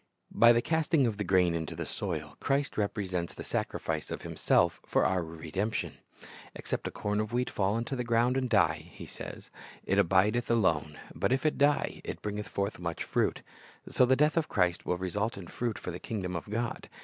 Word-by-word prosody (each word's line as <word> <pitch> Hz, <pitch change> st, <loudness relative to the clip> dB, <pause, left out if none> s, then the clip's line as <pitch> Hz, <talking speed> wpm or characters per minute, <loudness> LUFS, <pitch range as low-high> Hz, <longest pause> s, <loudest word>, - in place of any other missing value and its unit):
By 120 Hz, 0 st, +7 dB
the 120 Hz, 0 st, +3 dB
casting 160 Hz, -2 st, +2 dB
of 110 Hz, -4 st, -1 dB
the 105 Hz, -, -1 dB
grain 90 Hz, -2 st, +3 dB
into 80 Hz, -2 st, -3 dB
the -, -, -4 dB
soil, 75 Hz, -7 st, -4 dB
Christ 140 Hz, +1 st, 0 dB
repre 105 Hz, -1 st, -1 dB
sents 90 Hz, -2 st, -3 dB
the -, -, -7 dB
sacrifice 80 Hz, -2 st, -2 dB
of -, -, -5 dB
Himself -, -, +2 dB
for -, -, +2 dB
our 95 Hz, -2 st, +1 dB
redemption. 85 Hz, +6 st, -3 dB, 0.6 s
"Except -, -, -3 dB
a -, -, -4 dB
corn 105 Hz, 0 st, -1 dB
of 110 Hz, +1 st, -2 dB
wheat 125 Hz, +1 st, 0 dB
fall 100 Hz, +2 st, +1 dB
into 120 Hz, +4 st, -2 dB
the 125 Hz, -, -2 dB
ground 120 Hz, +2 st, +2 dB
and 130 Hz, -1 st, 0 dB
die," 110 Hz, -3 st, +2 dB
He -, -, -9 dB
says, -, -, -9 dB, 0.3 s
"it 100 Hz, -, +2 dB
abideth 100 Hz, +6 st, +3 dB
alone; 80 Hz, -10 st, +2 dB, 0.2 s
but 100 Hz, +8 st, 0 dB
if 130 Hz, +3 st, +1 dB
it 155 Hz, -, +1 dB
die, 145 Hz, +1 st, +2 dB
it -, -, -5 dB
bringeth 105 Hz, 0 st, -3 dB
forth 100 Hz, 0 st, -2 dB
much 85 Hz, -1 st, -3 dB
fruit. -, -, 0 dB, 0.5 s
"^ -, -, -11 dB
So 125 Hz, -, +5 dB
the 130 Hz, -, +5 dB
death 150 Hz, +4 st, +3 dB
of 160 Hz, -, +1 dB
Christ 90 Hz, -3 st, +1 dB
will 90 Hz, -, +1 dB
result 100 Hz, +5 st, -2 dB
in 95 Hz, -, -7 dB
fruit 115 Hz, +5 st, -3 dB
for 90 Hz, -, -5 dB
the 85 Hz, -, -6 dB
kingdom 95 Hz, -5 st, -4 dB
of 85 Hz, -, -5 dB
God. 115 Hz, +2 st, -3 dB
105 Hz, 210 wpm, -30 LUFS, 90-120 Hz, 0.6 s, By